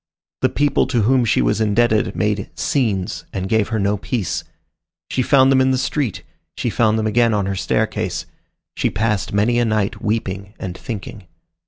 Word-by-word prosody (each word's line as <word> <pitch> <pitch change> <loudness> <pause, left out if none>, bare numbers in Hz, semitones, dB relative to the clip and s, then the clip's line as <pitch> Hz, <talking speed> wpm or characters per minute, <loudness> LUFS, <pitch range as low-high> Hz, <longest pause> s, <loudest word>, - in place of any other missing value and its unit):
The - - +3
people 145 -1 +1
to 120 -5 +1
whom 125 +2 +3
she 90 - +2
was - - +1
indebted 110 -2 +2
made 105 -2 -1
"scenes" 105 -10 -1
and 95 -1 -3
gave 110 0 +2
her 115 - -2
no 100 0 +1
peace. 105 -1 -2 0.7
She 130 - +1
found 135 +1 +5
them 130 -1 +4
in 130 - +3
the 130 - +2
street, 125 - -2 0.3
she - - -1
found 110 -2 +2
them 110 - -1
again 115 +1 +3
on 100 -2 0
her 95 0 -2
staircase. - - -1 0.5
She - - +1
passed 105 -4 -1
many 110 +4 +2
a - - +3
night 110 -3 -1
weeping 100 -2 -3
and 90 -2 -5
thinking. 105 -3 -7
110 Hz, 180 wpm, -20 LUFS, 100-120 Hz, 0.7 s, found